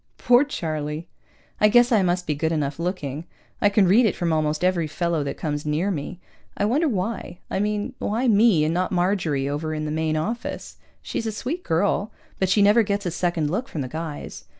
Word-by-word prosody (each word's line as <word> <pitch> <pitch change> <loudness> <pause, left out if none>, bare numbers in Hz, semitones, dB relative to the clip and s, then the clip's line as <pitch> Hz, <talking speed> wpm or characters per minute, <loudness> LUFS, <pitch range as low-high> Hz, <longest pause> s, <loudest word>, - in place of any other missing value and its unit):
Poor 245 +2 +5
Charlie! 155 - -4 0.5
I 210 - +6
guess 240 +3 +5
I 220 -4 +5
must 180 -1 0
be 155 - 0
good 160 +2 -1
enough 150 -2 -2
looking. 170 -4 -3 0.4
I 205 - +5
can 200 -2 +3
read 220 +6 +5
it - - -1
from 170 -2 0
almost 155 +1 0
every 180 -3 +2
fellow 165 0 -1
that 140 - -4
comes 150 -3 -3
near 155 +6 0
me. 175 +2 -5 0.4
I 205 - +1
wonder 285 +10 +2
why? 205 -3 -3
I - - 0
mean, 210 +4 -1
why 235 +5 0
me 210 -7 +5
and 160 - 0
not 180 +1 0
Marjorie 175 -7 0
over 155 +2 -2
in 155 0 -3
the 150 - -3
Main 155 0 0
Office? 225 +10 -4 0.3
She's 225 - -3
a - - -1
sweet 270 - -4
girl, 200 - 0 0.3
but 190 - +1
she 200 +1 +4
never 210 +3 +6
gets 200 -2 -1
a 175 - -1
second 170 -3 -1
look 230 +9 -2
from 155 - -5
the 130 - -3
guys. 155 +1 -6
175 Hz, 210 wpm, -24 LUFS, 155-210 Hz, 0.5 s, I